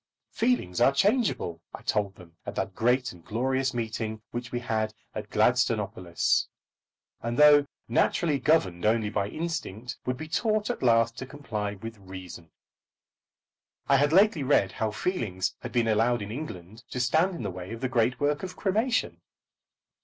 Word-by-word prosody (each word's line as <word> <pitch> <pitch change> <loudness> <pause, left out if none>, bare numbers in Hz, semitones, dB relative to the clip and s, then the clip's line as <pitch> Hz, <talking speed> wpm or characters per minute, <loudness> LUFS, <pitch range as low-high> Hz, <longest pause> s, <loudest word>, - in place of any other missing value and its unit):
Feelings 225 - 0
are 130 - +6
changeable, 200 - +1
I - - -13
told 100 -2 0
them 85 -3 -16
at - - -6
that 95 - -2
great 125 +4 +1
and 85 -2 -15
glorious 130 +5 0
meeting 110 -2 -4
which 120 0 -5
we 120 - -1
had 110 -3 -2 0.2
at 105 -1 -6
Gladstonopolis, 105 -6 +1 0.7
and 115 +1 -3
though 145 -1 +7 0.2
naturally 155 -5 +2
governed 95 - +2
only 110 -1 +2
by 100 - 0
instinct, 155 - -4
would 125 0 0
be 160 - -6
taught 215 +6 0
at - - -6
last 115 -1 +3
to 130 - -6
comply 110 -8 -4
with 115 +2 -9
reason. 95 -3 -10 1.4
I 140 - +5
had 145 +2 +3
lately 190 -2 +5
read 130 -8 +3
how 110 +3 -1
feelings 105 - -2
had - - -7
been 120 -2 +1
allowed 115 +1 +2
in 100 - -7
England 110 - -7
to 125 - -4
stand 160 +9 +2
in 125 - -6
the 100 - -2
way 90 +2 -8
of 115 - -6
the 130 - 0
great 125 0 +1
work 145 +1 +1
of 185 -1 -6
cremation. 220 +5 0
120 Hz, 165 wpm, -27 LUFS, 105-145 Hz, 1.4 s, though